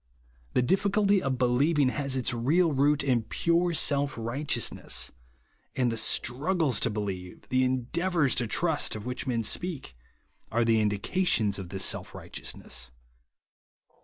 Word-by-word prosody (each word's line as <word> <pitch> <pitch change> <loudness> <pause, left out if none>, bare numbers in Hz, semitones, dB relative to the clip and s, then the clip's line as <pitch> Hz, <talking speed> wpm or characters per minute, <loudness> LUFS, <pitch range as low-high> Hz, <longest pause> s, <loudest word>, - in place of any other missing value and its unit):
The 125 - +2
difficulty 200 - +2
of 135 -4 -1
believ 130 +6 +2
ing 140 -3 +4
has 135 -1 -2
its 130 -1 0
real 155 +9 +2
root 145 +1 +2
in 125 -4 +2
pure 170 +8 0
self 145 -2 +2
righteous 120 0 -1
ness; - - -1 0.6
and 125 -2 +1
the - - -2
struggles 135 - +1
to - - +2
believe, 100 -4 -5
the 130 0 +2
eiideavoiirs 140 +4 0
to 120 -1 0
trust, 160 +6 +1
of 105 0 -7
which 125 +2 -4
men 115 -3 0
speak, 150 - -2 0.6
are 120 +1 +1
the 115 -1 +3
indications 105 - +1
of 95 -3 -7
this 95 +1 +1
self - - -1
rigliteous - - -6
ness. 65 0 -6
130 Hz, 150 wpm, -28 LUFS, 115-155 Hz, 0.6 s, ing